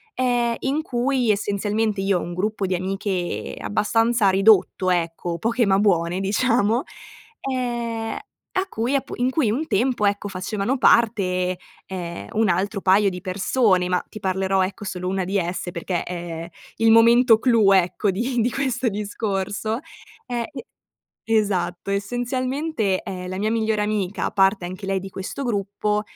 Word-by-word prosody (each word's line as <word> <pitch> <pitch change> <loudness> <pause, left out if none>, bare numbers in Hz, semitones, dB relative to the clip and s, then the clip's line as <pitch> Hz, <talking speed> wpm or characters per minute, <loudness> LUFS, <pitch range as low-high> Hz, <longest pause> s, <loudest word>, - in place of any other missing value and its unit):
ehm, 245 -2 +1
in 280 +4 -1
cui 250 -3 +1
essenzialmente 205 +1 -1
io 195 -2 +1
ho - - -4
un 175 - -5
gruppo 200 +2 -1
di 185 - 0
amiche 185 - -3
abbastanza 225 - +2
ridotto, 195 -1 +4
ecco, 170 -1 -1
poche 230 +4 +1
ma 195 -1 +3
buone 175 -3 +2
diciamo, 225 +3 +2 0.7
ehm, 235 -3 -2 0.4
a 375 +1 0
cui 240 +2 -1
appu 275 - -2
in 245 +1 +1
cui 260 -3 +1
un 285 +8 -1
tempo, 240 -1 +1
ecco, 205 0 0
facevano 200 +6 -2
parte, 185 -7 +3 0.3
ehm, 175 -2 -6
un 220 -2 +2
altro 195 +3 0
paio 195 +1 +4
di 180 -1 -7
persone, 185 0 +1
ma 180 0 0
ti 215 - -9
parlerò, 190 0 +1
ecco, 200 +2 -7
solo 180 -2 -4
una 190 0 -1
di 195 +3 -1
esse 175 0 -2
perché 180 -1 -3
é 170 -2 -6 0.3
il 225 0 +4
momento 230 +1 +6
clou, 225 -5 +4
ecco, 190 +2 +2
di 240 +5 -1
di 235 - +2
questo 255 -2 0
discorso, 205 +1 -2 0.5
ehm, 240 -1 -2 0.8
e 225 0 +2
esatto. 195 -3 -1
Essenzialmente, 245 +1 -1
ehm, 180 -1 -6
la 185 +1 -4
mia 215 +2 0
migliore 220 -1 0
amica, 210 -2 -1
parte 195 -1 +3
anche 185 +3 -7
lei 195 -1 0
di 195 - -7
questo 190 +9 -5
gruppo, 210 -1 -1
205 Hz, 155 wpm, -23 LUFS, 185-235 Hz, 0.8 s, momento